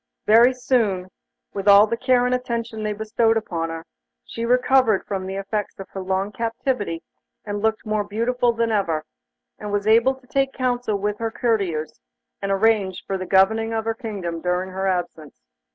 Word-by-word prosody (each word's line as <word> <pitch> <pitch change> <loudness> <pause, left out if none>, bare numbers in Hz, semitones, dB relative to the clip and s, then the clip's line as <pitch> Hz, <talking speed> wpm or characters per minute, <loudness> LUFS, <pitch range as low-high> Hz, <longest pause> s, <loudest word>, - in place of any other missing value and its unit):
Very 230 +4 +6
soon, 225 -8 0 0.4
with 195 0 -4
all 200 +1 +8
the 225 - -2
care 250 0 +2
and 250 - +1
attention 235 -3 -3
they 215 0 -1
bestowed 225 +2 +1
upon 170 -6 -3
her, 165 0 -6 0.4
she 230 - -5
recovered 250 -3 +3
from 190 -2 -4
the 190 - -4
effects 200 +1 -3
of 195 - -9
her 195 - -6
long 190 +2 -1
captivity 230 - -2 0.4
and 205 -1 -4
looked 220 +1 0
more 215 -1 0
beautiful 235 +4 0
than 230 0 -1
ever, 170 -7 0 0.6
and 210 -1 -6
was 205 0 -1
able 230 +5 +4
to 260 -1 -21
take 270 +1 0
counsel 245 -4 -1
with 210 +1 -2
her 225 0 -1
courtiers, 195 - -1 0.4
and 195 0 -2
arrange 195 -2 +1
for 195 - -2
the 185 -1 -4
governing 220 +4 +3
of 220 0 -2
her 225 - 0
kingdom 200 -8 -5
during 180 +2 -1
her 190 +1 -2
absence. 175 -5 -3
215 Hz, 180 wpm, -22 LUFS, 190-230 Hz, 0.6 s, all